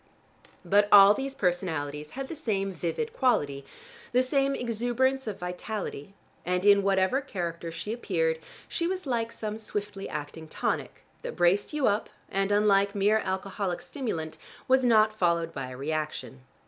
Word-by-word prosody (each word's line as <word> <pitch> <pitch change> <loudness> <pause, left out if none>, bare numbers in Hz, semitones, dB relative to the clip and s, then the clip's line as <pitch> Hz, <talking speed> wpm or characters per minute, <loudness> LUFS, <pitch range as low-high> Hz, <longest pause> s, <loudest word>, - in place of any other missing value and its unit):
But 205 +1 +4
all 200 0 +10
these 270 +3 -4
personalities 160 - -1
had 270 0 -3
the 330 - -6
same 200 -10 -1
vivid 180 - -3
quality, 145 - +1 0.5
the 250 +1 +4
same 275 +1 +1
exuberance 245 +2 0
of 205 -3 -3
vitality, 185 -1 -5 0.3
and 180 +1 -1
in 200 -1 +7
whatever 195 +6 +2
character 170 -9 -4
she 165 +7 -4
appeared 165 -8 0 0.3
she 335 - -1
was 370 -1 -3
like 230 -3 -1
some 215 -1 -5
swiftly 205 -2 -5
acting 155 +2 -6
tonic, - - -3 0.2
that - - -6
braced 175 +3 +2
you 300 -3 0
up 205 +1 +1 0.2
and, 195 +1 0
unlike 200 -1 +3
mere 205 +2 +3
alcoholic 190 -1 -2
stimulant, 165 - -5 0.3
was 260 0 +4
not 220 -3 +5
followed 170 -4 +1
by 135 -2 -5
a 125 - -8
reaction. 150 -1 -4
200 Hz, 150 wpm, -28 LUFS, 170-235 Hz, 0.5 s, all